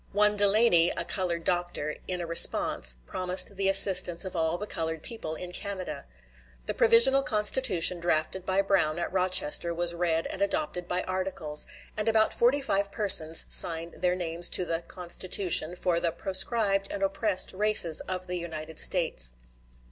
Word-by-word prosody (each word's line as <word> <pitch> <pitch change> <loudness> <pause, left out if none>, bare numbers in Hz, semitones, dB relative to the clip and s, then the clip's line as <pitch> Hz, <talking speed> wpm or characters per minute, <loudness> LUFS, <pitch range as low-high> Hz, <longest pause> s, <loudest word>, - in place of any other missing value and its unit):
One 210 +1 +2
Delany, 200 -4 +3
a 170 - -5
colored 170 -3 -4
doctor, 175 -4 -3
in 180 -1 -4
a - - -5
response, 115 - +2
promised 185 - -2
the 195 0 -1
assistance 195 -2 +3
of 185 - -7
all 165 0 -2
the 210 - -6
colored 160 -5 -5
people 160 -9 -6
in 180 +2 -9
Canada. 195 0 -7 0.6
The - - -4
provisional 235 +4 +4
constitution 210 -6 +1
drafted 170 +2 -2
by 190 +1 -1
Brown 190 -6 0
at 175 +1 -5
Rochester 180 -3 +1
was 175 0 -3
read 170 -1 -2
and 190 - -7
adopted 200 - -3
by 180 +1 -3
articles, 185 -5 -1 0.3
and 215 +1 -2
about 220 -1 +1
forty 255 +4 +1
five 200 -6 -2
persons 165 -6 +5
signed 165 0 +4
their 180 0 0
names 175 -1 -1
to 180 - -2
the 165 -1 -4
"Constitution," 180 -1 0
for 175 -1 -1
the 170 -1 -2
"proscribed 195 +3 -2
and 195 - -5
oppressed 195 0 0
races 205 -5 +4
of 185 0 -6
the 180 0 -5
United 160 -2 -7
States." - - +2
180 Hz, 160 wpm, -26 LUFS, 170-200 Hz, 0.6 s, persons